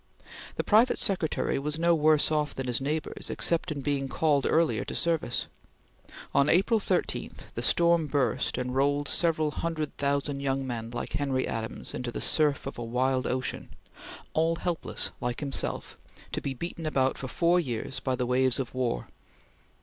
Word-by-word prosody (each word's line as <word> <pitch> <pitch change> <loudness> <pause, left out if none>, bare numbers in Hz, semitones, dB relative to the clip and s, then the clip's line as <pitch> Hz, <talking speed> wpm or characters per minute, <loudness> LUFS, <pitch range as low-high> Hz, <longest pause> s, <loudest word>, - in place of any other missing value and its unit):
The - - -1
private 225 +4 +4
secretary 180 -7 +1
was 150 +2 -2
no 170 +1 +3
worse 155 -1 +4
off 150 -1 0
than 135 - -3
his 125 0 0
neighbors 150 +3 -3
except 170 0 0
in 145 -2 -3
being 140 -1 -1
called 145 -1 +2
earlier 165 0 +3
into - - -4
service. 165 -8 0 0.9
On 140 +1 +4
April 195 +6 +4
13 - - -1 0.2
the - - -3
storm 170 -2 +4
burst 135 -6 0
and 125 0 -2
rolled 145 +2 +1
several 155 -2 +2
hundred 155 -2 -3
thousand 140 0 0
young 135 -1 -1
men 115 -3 -4
like 120 - -5
Henry 135 -2 0
Adams 110 0 -4
into 125 -1 -4
the - - -5
surf 150 -2 +2
of 135 - -6
a - - -3
wild 130 +2 0
ocean, 130 +1 -3 0.6
all 165 +1 +2
helpless 175 0 -2
like 120 -1 -2
himself, 140 -2 -3 0.3
to - - -2
be 135 -1 -3
beaten 170 +2 -5
about 130 -3 +1
for 135 - -6
four 170 +6 +3
years 130 -4 -2
by 130 -1 -1
the 125 0 -1
waves 130 0 +2
of 130 -3 -3
war. 125 - -1
140 Hz, 170 wpm, -28 LUFS, 130-160 Hz, 0.9 s, private